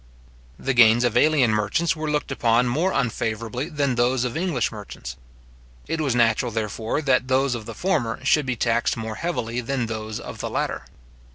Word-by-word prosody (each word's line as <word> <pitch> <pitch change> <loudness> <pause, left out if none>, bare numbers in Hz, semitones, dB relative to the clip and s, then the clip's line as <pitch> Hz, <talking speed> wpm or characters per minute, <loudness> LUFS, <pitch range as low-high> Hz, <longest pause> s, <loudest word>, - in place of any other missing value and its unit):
The 135 - -1
gains 120 -1 +6
of 120 -2 +1
alien 145 -7 +4
merchants 110 +12 +1
were 155 -1 -3
looked 150 -2 -1
upon 120 -2 +2
more 160 +10 +1
unfavourably 115 - -2
than 145 -5 0
those 120 +1 +1
of 125 -2 -3
English 160 -7 0
merchants. 100 - -8 0.7
It 165 -1 -2
was 135 -5 0
natural, 120 0 +2
therefore, 110 +5 -2
that 130 -2 +2
those 130 0 +2
of 115 -2 -6
the 115 - -7
former 125 -12 -1
should 150 -1 +3
be 130 - 0
taxed 115 +1 +1
more 110 -1 -4
heavily 125 -4 -3
than 125 0 -2
those 110 -1 -5
of - - -9
the - - -3
latter. - - -2
120 Hz, 180 wpm, -23 LUFS, 115-140 Hz, 0.7 s, gains